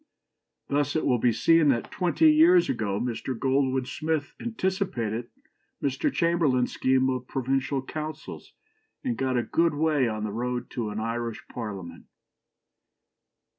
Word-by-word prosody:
" - - -58
Thus 145 0 +1
it 155 - 0
will 125 -2 +2
be 120 +1 +3
seen 165 +7 +4
that 120 -4 0
twenty 250 - +3
years 340 +3 +6
ago 100 -2 -1
Mr. 125 +1 -3
Goldwin 130 0 +1
Smith 155 +2 -2
anticipated 185 - -2 0.5
Mr. 140 - 0
Chamberlain's 165 - +1
scheme 130 0 +2
of 125 -1 -4
provincial 135 +1 -1
councils, 155 +3 -7 0.5
and 250 -4 -1
got 130 - 0
a 120 - +1
good 165 +3 +1
way 150 -4 +2
on 110 -1 -3
the 105 - -2
road 125 +3 -3
to 115 -3 -3
an 105 +1 -4
Irish 115 0 -3
Parliament. 105 -7 -7
130 Hz, 140 wpm, -26 LUFS, 120-160 Hz, 0.5 s, years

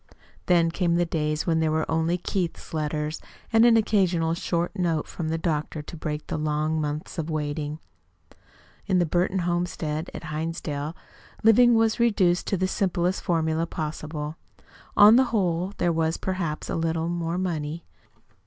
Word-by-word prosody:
Then 170 -2 +4
came 170 -1 +1
the 175 0 +2
days 155 -2 -1
when 165 -2 +2
there 160 -1 +2
were 155 0 +1
only 160 +2 +1
Keith's 180 -2 -3
letters 150 0 -2 0.3
and 225 +1 +7
an 230 -1 +6
occasional 185 -7 +2
short 170 +2 -2
note 170 -5 0
from 160 -3 -4
the 165 - 0
doctor 155 -2 -2
to 160 - -9
break 150 -1 -4
the - - -3
long 155 +1 0
months 150 +3 -4
of 160 0 -3
waiting. 150 -1 -3 1.1
In 185 - +2
the 175 - +3
Burton 175 +4 0
homestead 175 -2 -2
at - - -8
Hinsdale, 155 -1 -4 0.5
living 235 +2 +6
was 225 +1 +2
reduced 195 -7 +2
to 195 - 0
the 185 +1 +1
simplest 185 -1 0
formula 165 -1 0
possible. 155 -1 -5 0.6
On 210 +3 +9
the 260 - +5
whole, 185 -5 0
there 175 -1 +1
was 160 0 0
perhaps 175 -5 -3
a - - -2
little 165 0 -1
more 170 0 -2
money. 165 -3 -3
165 Hz, 160 wpm, -25 LUFS, 155-180 Hz, 1.1 s, On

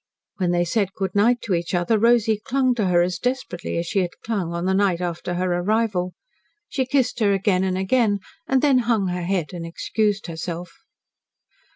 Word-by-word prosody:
When 180 -3 0
they 175 0 +2
said 195 +1 0
good 190 -2 -2
night 235 +4 +3
to 200 - -1
each 170 +1 -1
other 175 +5 +2
Rosy 225 -2 +3
clung 260 -1 +2
to 215 -5 0
her 175 -1 +4
as 180 -1 -2
desperately 250 -11 -3
as 170 - -1
she 195 - 0
had 180 -2 0 0.2
clung 200 -7 -2
on 170 +1 -3
the 190 - +2
night 190 -3 +2
after 175 0 -3
her 180 0 0
arrival. 195 -2 0 0.5
She 260 -5 -2
kissed 255 -2 +1
her 205 -3 +3
again 190 -1 +1
and 185 -1 0
again, 205 +2 +2 0.3
and 265 -4 +2
then 275 -3 +5
hung 225 -5 +1
her 180 0 -2
head 180 -1 -1
and 175 -2 -5
excused 205 +5 -1
herself. 170 +1 -5
190 Hz, 195 wpm, -23 LUFS, 175-225 Hz, 0.5 s, then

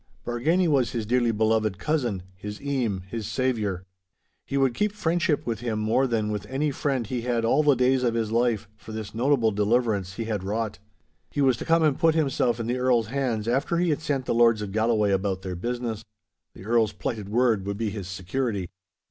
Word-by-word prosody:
Bargany 160 +10 +1
was 135 -6 +2
his 115 -3 -2
dearly 120 +1 +2
beloved 110 -2 +1
cousin, 120 - -1
his 105 +2 -7
eame, 125 -10 -1
his 110 -2 -4
saviour. 110 -8 -1 0.6
He 140 - -1
would 135 -3 +3
keep 210 - 0
friendship 170 -5 0
with 115 -3 -2
him 115 -3 -2
more 110 +5 +2
than 110 -3 0
with 105 -1 -4
any 145 +3 -1
friend 135 -3 -1
he 120 +3 -3
had 120 -1 0
all 135 +6 +4
the 145 -2 +4
days 130 +1 +3
of 120 -2 +1
his 110 -2 -1
life, 115 -3 +1
for 110 +1 -11
this 110 -1 -6
notable 120 -1 +2
deliverance 105 -2 +1
he 115 - -3
had 110 -4 -3
wrought. 105 +1 -2 0.5
He - - -5
was 130 -2 +4
to - - -6
come 165 0 +3
and 150 -3 +2
put 165 -1 +4
himself 135 -6 +1
in 115 - -2
the 125 +2 -1
Earl's 120 -3 +2
hands 120 -5 -1
after 135 +7 +1
he 175 -1 +2
had 150 - -1
sent 140 -4 -1
the - - 0
lords 115 -2 +4
of 100 - -5
Galloway 110 -1 +2
about 95 -1 -1
their 95 -2 -4
business. 120 +3 -3 0.5
The 95 - -11
Earl's 110 -2 +2
plighted 105 -1 -4
word 110 -3 +2
would 100 0 -2
be 110 -1 -1
his 100 -3 -6
security. 95 +1 -3
115 Hz, 205 wpm, -26 LUFS, 105-130 Hz, 0.6 s, all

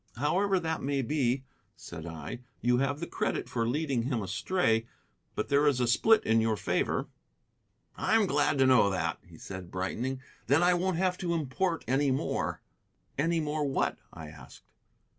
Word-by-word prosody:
"However 190 +8 +2
that 160 -2 -2
may 140 0 0
be," 130 -1 0 0.3
said 85 -1 -9
I, 80 +7 -6 0.2
"you 125 +1 +2
have 135 +2 0
the 170 - -3
credit - - -2
for 115 -1 -1
leading 140 -1 0
him 120 -3 -1
astray. 115 - 0 0.5
But - - -2
there 145 +1 +4
is 140 -3 +3
a 125 - +2
split 220 - +4
in 115 0 +3
your 110 -1 +1
favor." - - -1 0.9
"I'm 225 -2 +2
glad 145 -3 +1
to 135 - +4
know 130 -6 +5
that," 95 -2 -2
he - - -16
said, 95 -2 -8
brightening; 115 +9 -3 0.3
"then 145 +5 +4
I 180 +1 +5
won't 180 0 0
have 185 0 0
to 170 -2 -1
import 165 +4 -1
any 135 +3 +2
more." 130 +1 -1 0.6
"Any 165 +3 +2
more 150 -1 -1
what?" 140 -2 0
I 80 -2 -9
asked. - - -14
135 Hz, 170 wpm, -29 LUFS, 115-165 Hz, 0.9 s, know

